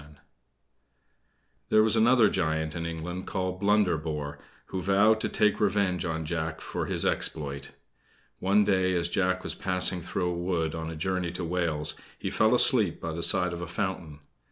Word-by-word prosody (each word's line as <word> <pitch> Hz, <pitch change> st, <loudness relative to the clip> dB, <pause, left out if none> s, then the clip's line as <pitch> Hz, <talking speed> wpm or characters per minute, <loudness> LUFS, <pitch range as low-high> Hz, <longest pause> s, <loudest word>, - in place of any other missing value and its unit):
There 110 Hz, -, +5 dB
was 110 Hz, 0 st, +2 dB
another 115 Hz, 0 st, +5 dB
giant 80 Hz, -4 st, -1 dB
in 85 Hz, -1 st, -4 dB
England 85 Hz, +3 st, -5 dB
called 95 Hz, -1 st, -3 dB
Blunderbore, 80 Hz, -8 st, 0 dB, 0.3 s
who 95 Hz, -, -3 dB
vowed 100 Hz, +4 st, +3 dB
to -, -, 0 dB
take 105 Hz, -1 st, +2 dB
revenge 100 Hz, -4 st, +1 dB
on 80 Hz, -1 st, -3 dB
Jack 80 Hz, 0 st, -3 dB
for -, -, -4 dB
this -, -, -1 dB
exploit. 70 Hz, -3 st, -2 dB, 0.7 s
One 100 Hz, +2 st, +3 dB
day, 95 Hz, -2 st, +2 dB
as 85 Hz, -1 st, 0 dB
Jack 95 Hz, 0 st, 0 dB
was -, -, -3 dB
passing 90 Hz, -1 st, +1 dB
through 90 Hz, +1 st, -2 dB
a -, -, -2 dB
wood 85 Hz, -2 st, -1 dB
on 80 Hz, -1 st, -5 dB
a 80 Hz, -, -6 dB
journey 90 Hz, +1 st, -2 dB
to 90 Hz, -, -4 dB
Wales, 85 Hz, -3 st, +1 dB, 0.2 s
he -, -, -4 dB
fell 110 Hz, +3 st, +3 dB
asleep 110 Hz, -8 st, +3 dB
by 85 Hz, -, -4 dB
the 80 Hz, +1 st, -4 dB
side 90 Hz, +1 st, +1 dB
of 85 Hz, -, -6 dB
a 90 Hz, -, -5 dB
fountain. 90 Hz, -6 st, -4 dB
90 Hz, 170 wpm, -27 LUFS, 80-95 Hz, 0.7 s, There